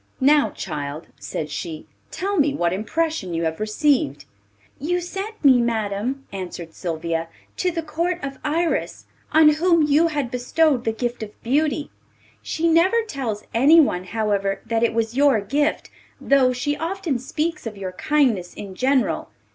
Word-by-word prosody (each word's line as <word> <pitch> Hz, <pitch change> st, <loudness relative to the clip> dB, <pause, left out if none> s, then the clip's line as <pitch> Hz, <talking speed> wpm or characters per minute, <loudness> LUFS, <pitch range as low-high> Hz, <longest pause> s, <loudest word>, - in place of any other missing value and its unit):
'Now, 290 Hz, +2 st, +4 dB
child,' 150 Hz, -2 st, -6 dB
said 150 Hz, -1 st, -5 dB
she, 160 Hz, 0 st, -5 dB, 0.2 s
'tell 395 Hz, +2 st, -2 dB
me 285 Hz, -1 st, +2 dB
what 175 Hz, 0 st, +1 dB
impression 215 Hz, -, -2 dB
you 165 Hz, -, -1 dB
have 160 Hz, 0 st, -2 dB
received.' 215 Hz, -, +1 dB, 0.5 s
'You 350 Hz, +6 st, 0 dB
sent 390 Hz, +2 st, -6 dB
me, 260 Hz, -3 st, +7 dB
madam,' 230 Hz, +3 st, -2 dB
answered 175 Hz, -3 st, -6 dB
Sylvia, 165 Hz, -1 st, -3 dB, 0.3 s
'to 365 Hz, -, 0 dB
the 330 Hz, -2 st, -3 dB
Court 335 Hz, +3 st, -1 dB
of 275 Hz, -1 st, -5 dB
Iris, 325 Hz, +3 st, -1 dB, 0.3 s
on 310 Hz, 0 st, +7 dB
whom 330 Hz, +2 st, +3 dB
you 300 Hz, +3 st, +4 dB
had 290 Hz, -6 st, -2 dB
bestowed 255 Hz, +1 st, +1 dB
the 225 Hz, -, +2 dB
gift 240 Hz, +2 st, -3 dB
of 210 Hz, -1 st, -8 dB
beauty. 295 Hz, +4 st, 0 dB, 0.5 s
She 330 Hz, +1 st, -1 dB
never 360 Hz, +8 st, +4 dB
tells 255 Hz, -, -4 dB
anyone, 270 Hz, -, +5 dB
however, 200 Hz, -1 st, -1 dB
that 225 Hz, -1 st, 0 dB
it 230 Hz, -1 st, +1 dB
was 230 Hz, 0 st, -1 dB
your 275 Hz, -4 st, +4 dB
gift, 290 Hz, +9 st, -1 dB, 0.3 s
though 270 Hz, -2 st, +4 dB
she 255 Hz, +4 st, -1 dB
often 330 Hz, -5 st, -2 dB
speaks 305 Hz, +2 st, -3 dB
of 215 Hz, -2 st, -7 dB
your 190 Hz, -2 st, -4 dB
kindness 245 Hz, -, +1 dB
in 200 Hz, -2 st, -8 dB
general. 260 Hz, +5 st, +1 dB
265 Hz, 155 wpm, -22 LUFS, 205-310 Hz, 0.5 s, me